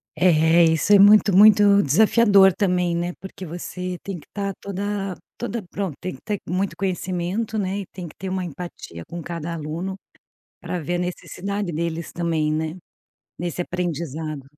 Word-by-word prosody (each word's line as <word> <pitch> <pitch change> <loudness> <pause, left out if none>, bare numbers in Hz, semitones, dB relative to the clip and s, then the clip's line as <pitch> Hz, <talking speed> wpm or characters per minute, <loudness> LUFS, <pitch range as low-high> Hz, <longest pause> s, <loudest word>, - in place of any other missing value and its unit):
É, 165 -1 +5
isso 160 +5 +3
é 200 - +8
muito 205 -1 +7
muito 205 0 +7
desafiador 200 - +5
também, 180 -3 +1
né? 175 +1 -2
Porque 190 -1 -9
você 180 +2 -5
tem 195 -3 -5
que - - -19
estar 200 -1 -4
toda 200 -1 -3 0.2
toda 235 -3 -3
pronto 180 -3 -4
Tem 185 - -4
que - - -17
ter 205 -2 -2
muito 185 +3 -1
conhecimento, 190 +3 -2
né, 195 0 -1
e 195 - -5
tem 180 -3 -8
que 155 - -14
ter 190 - -6
uma 185 -1 -2
empatia 150 - -8
com 170 0 -7
cada 170 0 -5
aluno, 165 +5 -4 0.6
pra 180 - -4
ver 170 +2 -3
a 175 - 0
necessidade 185 +2 -4
deles 165 +1 -3
também, 160 -3 0
né, 160 +1 -2 0.6
nesse 175 0 -3
aprendizado. 160 -5 -4
180 Hz, 165 wpm, -23 LUFS, 170-195 Hz, 0.6 s, é